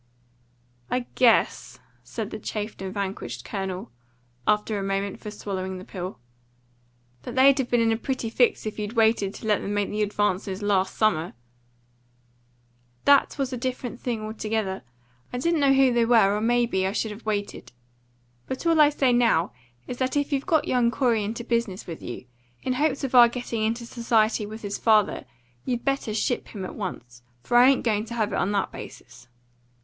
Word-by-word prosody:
"I 250 -1 -1
guess," 240 -3 +2 0.2
said - - -6
the - - -5
chafed 210 -1 -5
and 190 -1 -4
vanquished 190 - -5
Colonel, 190 -6 -4 0.6
after 210 0 +1
a - - -3
moment 195 0 -2
for 210 - -7
swallowing 190 -2 -5
the 185 - -10
pill, 185 0 -6 1.0
"that - - -7
they'd 270 +1 +6
have 255 - -1
been 240 -1 +3
in 225 0 +3
a 225 - +1
pretty 245 -2 -3
fix 245 -1 +2
if 215 0 -5
you'd 210 +1 -4
waited 220 -4 +2
to - - -9
let 210 -2 +2
them 205 - -3
make 205 -1 0
the 210 +1 -2
advances 205 -1 -1
last 195 -2 +1
summer." 175 -6 +1 1.7
"That 285 +1 +4
was 270 -2 -2
a - - -2
different 250 -1 -4
thing 230 -4 -3
altogether. 215 -2 -3 0.5
I 245 - -3
didn't 335 +5 +1
know 280 -1 +4
who 265 -2 +4
they 235 -1 +3
were, 225 -4 +5
or 210 - -2
may 240 +1 +3
be 190 -5 0
I 195 - -2
should 220 0 -1
have 215 +2 -11
waited. 205 - -3 0.8
But 260 - -5
all 330 -2 +5
I 295 - +7
say 270 -4 +2
now 230 -8 +3 0.3
is 245 - -6
that 260 +2 -1
if 285 0 0
you've 275 +3 -1
got 320 -5 +2
young 245 -2 +3
Corey 235 -4 +1
into 225 +3 -4
business 230 -5 -2
with 165 -2 -8
you, 120 - -7 0.4
in 255 - 0
hopes 280 +1 0
of 265 - -3
our 240 -2 +8
getting 240 -2 -4
into 230 +2 -1
society 230 -3 +1
with 220 +1 -9
his 200 0 -4
father, 215 -3 +3 0.4
you 245 - -1
better 275 -2 -2
ship 245 +2 -1
him 195 -4 -6
at - - -7
once. 120 - -7 0.2
For 240 - -2
I 250 +2 +8
ain't 275 - +2
going 215 -2 0
to 235 +1 -7
have 215 -3 -1
it - - 0
on 195 - 0
that 200 - 0
basis." 120 - -11
220 Hz, 190 wpm, -25 LUFS, 200-245 Hz, 1.7 s, our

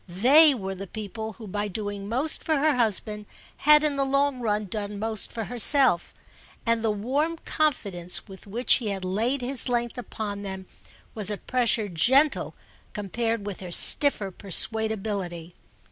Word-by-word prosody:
They 270 - +6
were 195 -4 -5
the 195 +1 -8
people 220 +2 -6
who 220 +3 -12
by 205 +1 -3
doing 205 0 -5
most 265 +7 0
for 315 - +1
her 300 0 +2
husband 210 -2 0 0.3
had 300 +1 +5
in 295 -2 0
the 275 - +2
long 275 0 0
run 215 -3 -1
done 205 +1 -5
most 220 0 -1
for 225 - -4
herself; 245 - +2 0.5
and 230 -1 +1
the 225 - +1
warm 270 +11 -1
confidence 200 - -1
with 190 0 -13
which 235 +5 +3
he 235 - -5
had 195 -2 -4
laid 230 +9 0
his 255 0 +3
length 240 0 -2
upon 210 -4 -6
them 190 -1 -7 0.5
was 215 -2 0
a 210 - -3
pressure 235 -3 0
gentle 265 - +2 0.4
compared 225 +1 -3
with 205 -3 -6
her 180 -2 -8
stiffer 210 - +2
persuadability. 195 -3 0
220 Hz, 160 wpm, -25 LUFS, 200-255 Hz, 0.5 s, They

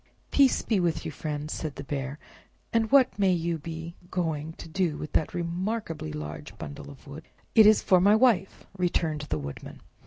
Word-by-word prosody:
"Peace 275 -2 +4
be 215 -4 +1
with 170 -3 0
you, - - -3
friend," 150 0 -4
said 155 -3 -4
the 140 - -6
Bear, 140 0 -4 0.6
"and 225 0 +2
what 270 -6 +5
may 195 -2 +4
you 170 -1 0
be 165 +2 -7 0.2
going 160 -3 -2
to - - -10
do 165 -2 -1
with 150 - -6
that 155 - 0
remarkably 170 -2 -3
large 150 0 -7
bundle 145 0 -8
of 140 -2 -14
wood?" 145 +3 -10 0.3
"It 220 -2 +8
is 215 - +5
for 185 -2 +5
my 205 +3 +6
Wife," 220 -5 +2
returned 170 -4 0
the - - 0
Woodman. 70 -1 -8
165 Hz, 185 wpm, -27 LUFS, 150-190 Hz, 0.6 s, It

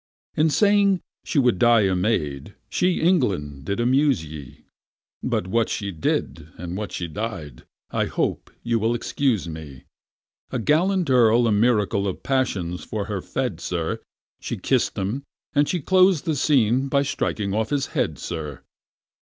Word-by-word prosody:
In 155 +1 +3
saying 200 +1 +4 0.2
she - - -3
would 125 -8 +3
die 120 -2 +5
a 95 -2 +2
maid, 80 -9 -1 0.2
she, 180 0 +1
England! 95 - +1
did 100 +6 -2
amuse 130 - +2
ye. 75 -4 -10 0.6
But - - -1
what 115 +4 +1
she 100 -2 -3
did, 80 -1 -2
and 90 +1 -6
what 100 -2 -4
she 85 - -4
died—I 80 - -5
hope - - -2
you 115 -1 +1
will 115 +2 +1
excuse 120 - 0
me: 80 -5 -8 0.7
A - - -2
gallant 165 - +2
Earl 120 -1 +5
a 115 - +2
miracle 105 -2 +2
of 95 - -5
passion 95 -10 -1
for 105 -2 -4
her 100 -3 -3
fed, 125 -8 -3
sir; 85 -2 -2 0.4
She - - -4
kiss'd - - 0
him, 105 +8 -2 0.3
and 145 0 +3
she 180 - 0
clos'd 185 +1 +4
the 160 -3 0
scene 130 -2 +2
by 140 0 +2
striking 105 -7 -2
off 110 +1 0
his 140 -2 0
head, - - 0
sir! 75 -5 -6
110 Hz, 155 wpm, -23 LUFS, 90-140 Hz, 0.7 s, die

